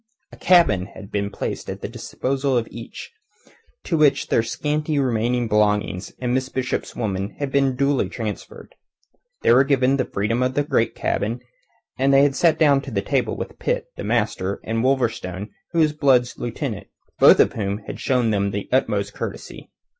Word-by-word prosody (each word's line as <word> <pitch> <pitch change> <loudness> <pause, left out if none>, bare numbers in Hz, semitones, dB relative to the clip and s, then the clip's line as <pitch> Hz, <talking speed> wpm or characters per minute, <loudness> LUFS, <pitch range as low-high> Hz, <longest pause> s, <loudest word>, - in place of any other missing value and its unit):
A - - -12
cabin 135 - +4
had 100 -2 -11
been 100 0 -1
placed - - -5
at - - -6
the - - -4
disposal 135 0 -2
of 115 -1 -1
each, 115 - -9 0.7
to 170 - -1
which 145 -2 +3
their - - +3
scanty 150 +6 -2
remaining 120 -2 0
belongings 105 -3 0
and 125 -1 -1
Miss 130 0 0
Bishop's 130 -1 -3
woman 100 -3 -3
had 140 -2 -3
been 135 -2 +2
duly 140 -6 +1
transferred. 110 -1 -7 0.7
They - - +5
were 130 +3 +6
given 135 -1 +2
the 130 - 0
freedom 105 +5 -1
of 130 0 0
the 145 - +2
great 115 -5 0
cabin, 115 +4 -2 0.6
and 135 +1 +3
they 135 0 +6
had 140 -1 +2
sat 165 +1 +3
down 145 -3 +4
to 135 - -8
table - - -1
with - - -7
Pitt, - - -2
the - - -6
master, 95 +2 -1
and 115 +1 -2
Wolverstone, 110 -7 -1 0.2
who 170 - -4
was 155 -2 +3
Blood's 130 -5 +2
lieutenant, 120 -3 -5 0.3
both - - +7
of - - +4
whom 100 -2 -2
had - - -7
shown 125 -4 +1
them 100 -1 +1
the 100 0 -4
utmost 105 -6 0
courtesy. - - -7
125 Hz, 175 wpm, -22 LUFS, 105-140 Hz, 0.7 s, both